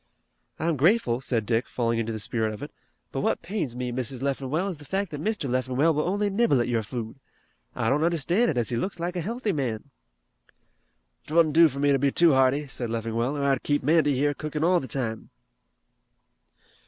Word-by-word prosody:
"I'm 165 Hz, -1 st, 0 dB
grateful," 140 Hz, -, +2 dB
said 120 Hz, -4 st, -1 dB
Dick 115 Hz, +2 st, 0 dB
falling 115 Hz, -1 st, 0 dB
into 115 Hz, 0 st, -2 dB
the 110 Hz, -, -3 dB
spirit 110 Hz, 0 st, -2 dB
of 105 Hz, -, -9 dB
it, -, -, -7 dB, 0.4 s
"but -, -, -2 dB
what -, -, 0 dB
pains 170 Hz, -, -3 dB
me, 125 Hz, 0 st, -3 dB
Mrs. 130 Hz, +1 st, -3 dB
Leffingwell, 140 Hz, +6 st, -1 dB
is 170 Hz, -6 st, -6 dB
the -, -, -11 dB
fact 190 Hz, +4 st, -2 dB
that 150 Hz, -1 st, -5 dB
Mr. 215 Hz, -9 st, -1 dB
Leffingwell 130 Hz, +5 st, +1 dB
will 150 Hz, +3 st, 0 dB
only 205 Hz, +2 st, 0 dB
nibble 200 Hz, -, +2 dB
at 120 Hz, -, 0 dB
your 120 Hz, -2 st, 0 dB
food. 115 Hz, +3 st, -6 dB, 0.6 s
I 115 Hz, -, -1 dB
don't 145 Hz, +6 st, +2 dB
understand 170 Hz, -, +2 dB
it, 150 Hz, -, -1 dB
as 120 Hz, -3 st, 0 dB
he 120 Hz, -, -1 dB
looks 175 Hz, +8 st, -3 dB
like 175 Hz, +2 st, -3 dB
a 175 Hz, -, -1 dB
healthy 225 Hz, +4 st, -2 dB
man." 130 Hz, -3 st, -3 dB, 1.4 s
"'Twouldn't 155 Hz, 0 st, +3 dB
do 165 Hz, +1 st, +7 dB
for 140 Hz, -2 st, -6 dB
me 145 Hz, 0 st, +2 dB
to 135 Hz, -, +3 dB
be 140 Hz, +1 st, +2 dB
too 170 Hz, 0 st, +5 dB
hearty," 135 Hz, +2 st, +3 dB
said 125 Hz, -3 st, -5 dB
Leffingwell, 115 Hz, +4 st, -2 dB
"or 140 Hz, -, -2 dB
I'd 135 Hz, -2 st, +2 dB
keep 145 Hz, -2 st, 0 dB
Mandy 150 Hz, -1 st, +3 dB
here 145 Hz, +3 st, +1 dB
cookin' 150 Hz, +1 st, -4 dB
all 180 Hz, +1 st, +4 dB
the 130 Hz, -, -7 dB
time." 110 Hz, -2 st, -4 dB
140 Hz, 205 wpm, -26 LUFS, 120-165 Hz, 1.4 s, do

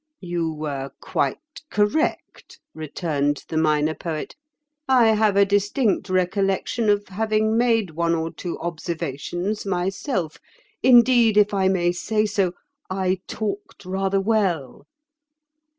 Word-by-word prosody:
"You 175 Hz, -3 st, -2 dB
were 145 Hz, -3 st, -4 dB
quite -, -, -1 dB, 0.3 s
correct," 210 Hz, +10 st, -1 dB
returned 145 Hz, -2 st, -2 dB
the -, -, -5 dB
Minor 155 Hz, 0 st, +2 dB
Poet. 155 Hz, -2 st, -5 dB, 0.5 s
"I 245 Hz, -4 st, +5 dB
have 215 Hz, -2 st, +3 dB
a 200 Hz, -, +6 dB
distinct 205 Hz, +1 st, +1 dB
recollection 195 Hz, +4 st, 0 dB
of 205 Hz, 0 st, +1 dB
having 215 Hz, +2 st, 0 dB
made 225 Hz, -5 st, +2 dB
one 170 Hz, +1 st, 0 dB
or 165 Hz, 0 st, -2 dB
two 175 Hz, +1 st, -6 dB
observations 170 Hz, +3 st, -4 dB
myself. 185 Hz, -, -2 dB, 0.4 s
Indeed, 240 Hz, -3 st, +5 dB
if 210 Hz, 0 st, +4 dB
I 190 Hz, -1 st, +2 dB
may 175 Hz, -2 st, +2 dB
say 215 Hz, +4 st, 0 dB
so, 200 Hz, -4 st, 0 dB, 0.4 s
I 185 Hz, 0 st, 0 dB
talked 205 Hz, -2 st, -5 dB
rather 195 Hz, +1 st, 0 dB
well." 190 Hz, -, -1 dB
190 Hz, 120 wpm, -23 LUFS, 170-215 Hz, 0.5 s, a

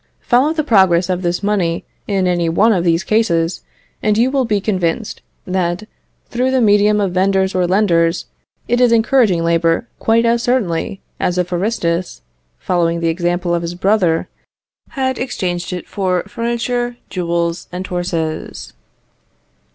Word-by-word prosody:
Follow 260 Hz, +5 st, +3 dB
the 315 Hz, -1 st, -1 dB
progress 190 Hz, -, +3 dB
of 180 Hz, 0 st, -1 dB
this 175 Hz, +2 st, -2 dB
money 190 Hz, -5 st, 0 dB, 0.2 s
in 195 Hz, -2 st, 0 dB
any 175 Hz, -2 st, +1 dB
one 215 Hz, +7 st, +3 dB
of 180 Hz, -4 st, 0 dB
these 170 Hz, +1 st, +2 dB
cases, 175 Hz, -6 st, +1 dB, 0.4 s
and 210 Hz, 0 st, +1 dB
you 245 Hz, +3 st, +3 dB
will 270 Hz, -2 st, +1 dB
be 210 Hz, -3 st, +1 dB
convinced, 190 Hz, 0 st, -2 dB, 0.2 s
that 180 Hz, 0 st, -1 dB, 0.4 s
through 250 Hz, +2 st, 0 dB
the 260 Hz, 0 st, +2 dB
medium 210 Hz, -1 st, +4 dB
of 195 Hz, -3 st, 0 dB
vendors 190 Hz, +1 st, +1 dB
or 180 Hz, -1 st, +1 dB
lenders, 175 Hz, -3 st, +2 dB, 0.4 s
it 240 Hz, +1 st, +1 dB
is 245 Hz, -2 st, +5 dB
encouraging 225 Hz, -6 st, +3 dB
labour 165 Hz, +4 st, +1 dB
quite 230 Hz, +1 st, +2 dB
as 235 Hz, 0 st, +2 dB
certainly 200 Hz, -7 st, -1 dB, 0.2 s
as 180 Hz, -, 0 dB
if 180 Hz, 0 st, -1 dB
Aristus, 175 Hz, -2 st, -2 dB, 0.3 s
following 170 Hz, -2 st, 0 dB
the 165 Hz, 0 st, 0 dB
example 175 Hz, +1 st, -1 dB
of 170 Hz, -, 0 dB
his 170 Hz, +1 st, -5 dB
brother, 180 Hz, -3 st, +1 dB, 0.6 s
had 260 Hz, -1 st, -2 dB
exchanged 180 Hz, -9 st, -3 dB
it 180 Hz, -1 st, -5 dB
for 185 Hz, -3 st, -1 dB
furniture, 240 Hz, +1 st, -2 dB
jewels, 170 Hz, -2 st, -2 dB
and 180 Hz, +1 st, -5 dB
horses. 175 Hz, -3 st, -4 dB
185 Hz, 150 wpm, -17 LUFS, 175-225 Hz, 0.6 s, is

